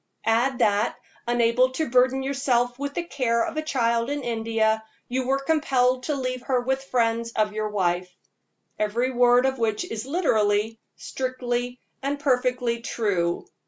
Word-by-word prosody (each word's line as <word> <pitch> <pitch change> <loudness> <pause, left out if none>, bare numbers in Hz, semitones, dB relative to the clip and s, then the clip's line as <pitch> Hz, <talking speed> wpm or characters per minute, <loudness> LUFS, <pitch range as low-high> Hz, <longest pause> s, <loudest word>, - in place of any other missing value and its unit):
Add 240 +4 +2
that, 210 -2 +2 0.3
unable 240 +1 +3
to 315 +4 -1
burden 255 +2 +3
yourself 255 -3 0
with 285 0 -4
the 345 - -1
care 245 -8 0
of - - -5
a 310 - 0
child 235 -5 0
in 290 -1 -3
India, 225 -2 0 0.2
you 255 +1 -2
were 270 +1 +2
compelled 270 -4 +1
to 300 - -1
leave 255 -2 -3
her 255 0 0
with 265 +2 -2
friends 230 -2 0
of 210 -1 0
your 215 0 -2
wife 180 -3 0 0.7
every 235 +5 0
word 245 0 +4
of 265 -1 0
which 225 +6 0
is 225 -6 -6
literally, 220 - +1 0.2
strictly, 250 -1 -3 0.2
and 280 +1 -2
perfectly 250 -3 +1
true. 190 -7 -1
245 Hz, 155 wpm, -25 LUFS, 225-265 Hz, 0.7 s, word